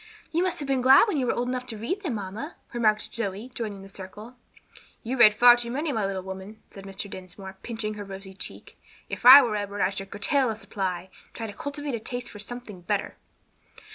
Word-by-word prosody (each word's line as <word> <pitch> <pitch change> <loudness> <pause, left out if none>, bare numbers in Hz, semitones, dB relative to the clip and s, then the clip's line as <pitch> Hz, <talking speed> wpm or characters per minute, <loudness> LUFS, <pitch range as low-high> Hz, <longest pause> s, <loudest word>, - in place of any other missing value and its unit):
"You 335 - +1
must 365 -1 +1
have 285 - -4
been 270 -2 +1
glad 265 - +7
when 405 - 0
you 255 -3 0
were - - +2
old 245 +1 -1
enough 250 0 -3
to 225 -3 -4
read 350 - -3
them, 310 - -2
mamma," 200 +1 -6 0.2
remarked 215 -3 +1
Zoe, 220 +2 -3
joining 210 -5 -5
the - - -11
circle. 205 +5 -10 0.7
"You 250 +2 -2
read 215 -4 +7
far 240 +2 +8
too 240 -1 -4
many, 295 +5 -1
my 215 -6 0
little 190 -1 -4
woman," 190 +3 -8
said 195 -1 -11
Mr. 195 +1 -4
Dinsmore, 190 0 -9
pinching 220 -2 -4
her 210 -1 -6
rosy 195 -1 -9
cheek. 190 - -9 0.3
"If - - 0
I 275 +2 +12
were 225 -4 -1
Edward, 205 -1 -3
I - - +3
should 195 0 -6
curtail 260 +7 +1
the 220 - -2
supply, 190 -4 -4
and - - -31
try 230 - -4
to 210 - -6
cultivate 285 +2 -5
a 235 - -2
taste 245 +2 -5
for 205 - -10
something 210 -3 -7
better." 200 +3 -2
215 Hz, 225 wpm, -26 LUFS, 195-250 Hz, 0.7 s, I